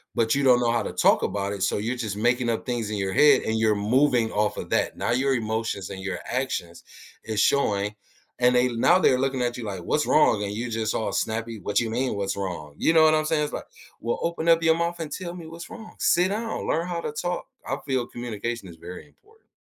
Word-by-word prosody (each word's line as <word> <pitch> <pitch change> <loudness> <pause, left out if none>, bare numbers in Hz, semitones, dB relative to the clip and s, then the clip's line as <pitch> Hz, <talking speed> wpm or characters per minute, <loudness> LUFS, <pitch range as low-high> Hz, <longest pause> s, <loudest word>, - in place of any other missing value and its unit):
but 115 -1 +2
you 140 0 +1
don't 125 -2 +5
know 120 -1 +2
how 115 -1 +1
to - - -5
talk - - +4
about 100 0 -2
it, 100 - -6
so - - +1
you're 115 +5 -2
just 110 -4 -4
making 120 +2 +1
up 115 - -2
things 120 -4 -2
in 105 - -3
your 95 -1 -2
head 150 +6 +6
and 110 0 -1
you're 110 -1 +3
moving 120 +2 +2
off 105 0 0
of - - -6
that, - - 0
now - - -1
your 130 +2 +2
emotions 110 -4 -2
and 95 -1 -7
your 95 0 -3
actions 120 -10 -3 0.4
is 110 -2 -2
showing 105 -6 +2 0.5
and 125 0 +4
they 125 +1 +4
now 120 +10 +4
they're 130 -7 +3
looking 135 -1 0
at 120 0 -2
you 120 - -6
like, 95 -4 -5
"What's 150 - 0
wrong?" 110 -9 +4
and 100 - -3
you 120 +3 -3
just 110 -1 -1
all 110 - -1
snappy, 115 0 -2
"What 100 +2 -5
do - - +4
you - - -3
mean, 125 -1 -1
'What's 100 0 -2
wrong?'" 90 -7 -5
you - - +3
know 160 - +6
what 155 0 +6
I'm 155 - +1
saying? 155 -1 +1
It's 150 - -4
like, - - -5 0.4
"Well, 120 - -1
open 170 0 -1
up 165 0 +5
your 160 0 +5
mouth 170 +1 -2
and 155 -2 -5
tell 175 +2 -5
me 170 -2 -9
what's 165 +1 -9
wrong, 220 -2 -11
sit 180 +2 +3
down, 220 +2 -3
learn 165 +2 0
how 175 -1 -3
to - - -4
talk." 175 +3 -3 0.2
I 135 - -1
feel 130 -3 -1
communication 115 -2 -5
is 85 - -11
very 90 - -10
important. 435 - -27
120 Hz, 250 wpm, -25 LUFS, 105-150 Hz, 0.5 s, head